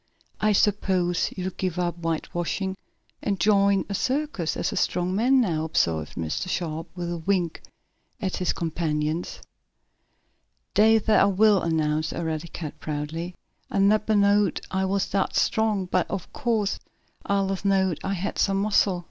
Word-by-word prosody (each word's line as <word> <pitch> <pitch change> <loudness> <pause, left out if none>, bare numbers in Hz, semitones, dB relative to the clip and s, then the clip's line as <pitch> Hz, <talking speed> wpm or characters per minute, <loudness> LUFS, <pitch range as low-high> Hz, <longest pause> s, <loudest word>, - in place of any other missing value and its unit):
"I 215 - +3
suppose 190 -4 +1
you'll 185 0 -2
give 185 -2 -2
up 175 -1 0
whitewashing 175 +3 -2 0.5
and 200 -2 -1
join 200 0 +3
a 200 - -4
circus 255 - -1
as - - -1
a - - -4
strong 180 +1 0
man, 255 +6 +4
now," 165 -10 +1
observed 80 - 0
Mr. 80 - -3
Sharp, 165 -2 -3
with 175 -1 -4
a 170 - -3
wink 175 -1 -1 0.6
at 190 -4 -2
his 180 - +1
companions. 160 -1 -2 1.3
"Days 220 0 +5
what 215 - +5
I - - +6
will!" 200 0 +4
announced 155 -1 0
Eradicate 160 -1 -4
proudly. 160 +4 -4 0.3
"I - - -3
neber 215 +2 +3
knowed 205 0 +3
I 190 0 0
was 195 0 0
dat 195 -1 -1
strong, 215 -3 +1
but 180 - 0
ob 195 -4 -5
course 225 -6 0 0.4
I 200 - 0
allers 195 -1 -1
knowed 190 -4 +2
I 195 - -1
had 195 +1 -3
some 195 -1 +2
muscle. 200 -2 +2
190 Hz, 150 wpm, -25 LUFS, 165-200 Hz, 1.3 s, I